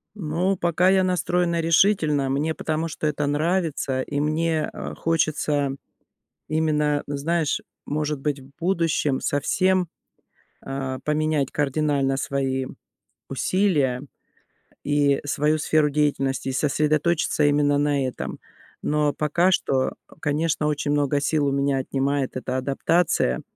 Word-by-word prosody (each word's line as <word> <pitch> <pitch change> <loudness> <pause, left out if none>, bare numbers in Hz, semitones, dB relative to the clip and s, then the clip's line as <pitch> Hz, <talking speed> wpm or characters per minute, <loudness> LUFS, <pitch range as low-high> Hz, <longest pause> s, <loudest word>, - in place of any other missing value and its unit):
Ну, 180 +1 0
пока 175 +1 +2
я 190 0 +4
настроена 180 -2 +1
решительно, 160 -4 +3
мне, 145 +4 0
потому 160 +1 -2
что 155 0 -3
это 150 0 -1
нравится, 150 -3 0
и 145 +2 -3
мне, 155 +1 0
э, - - -6
хочется 150 -3 0 0.7
именно, 150 -2 +1
знаешь, 150 +2 0 0.2
может 150 -1 -2
быть, 145 0 -1
в 135 +1 -16
будущем 165 -6 +1
совсем, 185 +5 +1 0.8
э-э, 135 -1 -4
поменять 150 -2 0
кардинально 140 -1 +1
свои 135 -1 -1 0.6
усилия 150 -10 +1 0.8
и 145 -1 +2
свою 150 +2 +1
сферу 150 0 +2
деятельности 135 -2 0
и - - -1
сосредоточиться 155 +3 +1
именно 145 0 +3
на 145 -2 +1
этом. 130 - -6 0.4
Но 150 -1 +1
пока 170 +5 +2
что, 135 -7 +1 0.3
конечно, 150 +1 0
очень 145 -1 -1
много 145 -1 +1
сил 150 0 +1
у - - +1
меня 140 0 +1
отнимает 135 0 -1
эта 130 0 -3
адаптация. 140 - +1
150 Hz, 120 wpm, -24 LUFS, 140-160 Hz, 0.8 s, я